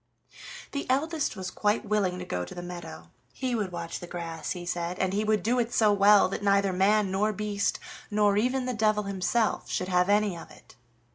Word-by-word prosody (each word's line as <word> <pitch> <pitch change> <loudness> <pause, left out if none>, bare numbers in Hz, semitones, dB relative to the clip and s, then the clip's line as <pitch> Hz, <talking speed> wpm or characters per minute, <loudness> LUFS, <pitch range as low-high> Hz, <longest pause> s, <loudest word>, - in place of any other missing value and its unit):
The 280 -2 -4
eldest 300 +2 0
was 185 -2 -5
quite 210 +1 0
willing 200 -4 0
to 180 - -6
go 90 - -3
to 90 - -9
the 175 - -6
meadow; 165 - -9 0.2
he 260 -2 -2
would 210 -5 -1
watch 170 -1 -5
the 175 - -8
grass, 165 -2 -5
he 175 -1 -7
said, 175 0 -3
and 190 0 0
he 210 +2 +1
would 215 -3 +1
do 245 +3 +1
it 235 0 -1
so 215 -2 +4
well 205 +1 +6
that 195 - -4
neither 200 -1 +2
man, 195 +1 +3
nor 205 +3 +1
beast, 205 -1 -1 0.3
nor 205 -1 +3
even 250 +4 +1
the 255 - -2
devil 215 -2 +1
himself 200 +3 -1
should 185 - -2
have 180 +1 +2
any 205 -2 +2
of 165 - -10
it. - - -18
200 Hz, 210 wpm, -27 LUFS, 180-215 Hz, 0.3 s, well